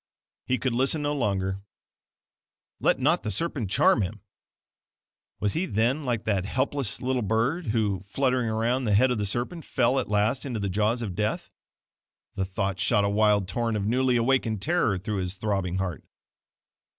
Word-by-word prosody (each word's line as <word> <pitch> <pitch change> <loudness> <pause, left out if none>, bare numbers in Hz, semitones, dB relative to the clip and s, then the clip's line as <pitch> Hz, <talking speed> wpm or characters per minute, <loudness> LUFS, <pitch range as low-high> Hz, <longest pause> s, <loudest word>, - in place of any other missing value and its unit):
He 130 - +1
could 130 -2 -1
listen 135 +5 +1
no 145 0 0
longer, 100 -7 -1 1.2
"Let - - +2
not 155 +7 +2
the 110 - -3
serpent 140 - -2
charm 105 - +4
him!" 100 +2 -4 1.2
Was 105 -1 0
he 185 +3 -1
then 125 +7 0
like 120 -3 -1
that 100 -4 0
helpless 130 +4 -1
little 130 0 0
bird, 115 - 0
who 105 -4 0
fluttering 125 0 0
around 120 +4 0
the 105 -2 +2
head 130 +5 +4
of 120 - -1
the 105 - -1
serpent, 125 - -3
fell 130 +1 +1
at 130 - -4
last 105 +5 +1
into 125 -5 -3
the 100 -1 -2
jaws 110 +5 0
of 100 -5 -4
death? 105 +3 -2 0.8
The 95 - -2
thought 95 0 -2
shot 105 -2 +2
a - - +1
wild 105 -2 +3
torrent 115 +4 -1
of 100 - -2
newly 125 +3 +2
awakened 120 -3 +1
terror 130 - +1
through 100 +3 -3
his 90 0 -2
throbbing 95 -3 -1
heart. 95 -3 -3
110 Hz, 175 wpm, -26 LUFS, 100-130 Hz, 1.2 s, charm